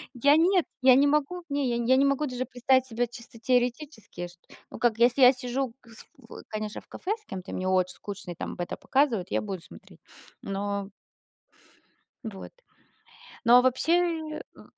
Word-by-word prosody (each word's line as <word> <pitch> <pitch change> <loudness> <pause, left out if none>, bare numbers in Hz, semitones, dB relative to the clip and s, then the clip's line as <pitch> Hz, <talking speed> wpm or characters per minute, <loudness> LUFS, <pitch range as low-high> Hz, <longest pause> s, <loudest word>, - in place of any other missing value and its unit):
Я- 285 +4 +5
нет. 360 +1 +3 0.2
Я 255 -1 +7
не 275 +2 +5
могу, 300 +5 0
не, 280 -2 0
я 235 - 0
не 235 0 -2
я - - +7
не 275 - +4
могу 275 +2 +1
даже 255 -2 -3
представить 260 +1 +2
себе 240 +1 -1
чисто 235 0 -13
теоретически 245 - -1
ш - - -16 0.4
ну - - -9
как, 235 -2 +2
если 240 +3 +3
я 250 0 +9
сижу, 255 -1 -3
кыс 230 -2 -15
в 240 -4 -12
конечно, 215 -1 -5
в - - -29
кафе 375 - -5
с - - -29
кем-то 185 - -7
и - - -6
мне 185 - -3
очень 185 -1 +1
скучно, 200 -3 -8
и - - -7
там - - -6
это 175 - -4
показывают, 255 -10 +1
я - - 0
буду 195 -4 -5
смотреть. - - -16 0.4
Но 200 0 -3 1.4
Вот. 210 -4 -8 0.9
Но, 240 +1 +8
а 250 - +5
вообще, 320 +4 +1
в - - -17
245 Hz, 185 wpm, -27 LUFS, 215-275 Hz, 1.4 s, я